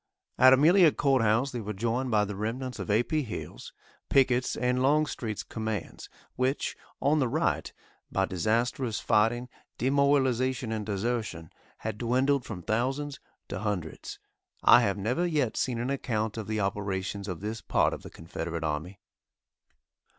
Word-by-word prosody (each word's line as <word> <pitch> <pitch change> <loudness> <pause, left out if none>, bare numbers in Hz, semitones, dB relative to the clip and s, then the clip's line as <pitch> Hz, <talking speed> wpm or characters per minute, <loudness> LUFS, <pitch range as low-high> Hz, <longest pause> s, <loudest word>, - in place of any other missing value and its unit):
At 130 +1 +8
Amelia 160 +5 +6
Courthouse 130 -2 +2
they 120 -3 -4
were 105 0 -4
joined 120 +5 -1
by 105 -3 +3
the 105 0 -5
remnants 125 +5 -4
of - - -5
A. 110 +3 +3
P. 155 +5 0
Hill's, 120 -7 -7 0.4
Pickett's 130 -2 +3
and 125 0 0
Longstreet's 135 -6 0
commands 110 -4 -5 0.3
which, 130 +2 -1 0.2
on 145 +3 +2
the 130 - +2
right, 155 +7 0 0.4
by 95 - +1
disastrous 115 +6 0
fighting, 115 +3 +2 0.3
demoralization 130 -2 +2
and 110 -2 -3
desertion, 105 -6 -2 0.3
had 110 -1 -5
dwindled 130 +3 +1
from 90 -6 -7
thousands 135 - -1 0.3
to - - -4
hundreds. 100 -7 -4 0.5
I 120 - +8
have 100 -3 0
never 120 - 0
yet 150 -9 0
seen 125 -2 -1
an 120 +3 -2
account 110 -5 -2
of 110 -3 -5
the 110 0 -1
operations 100 0 -2
of 90 -2 -5
this 110 +2 -4
part - - +2
of - - -6
the - - -10
Confederate 80 0 -5
army. 80 +6 -3
115 Hz, 150 wpm, -28 LUFS, 105-130 Hz, 0.5 s, At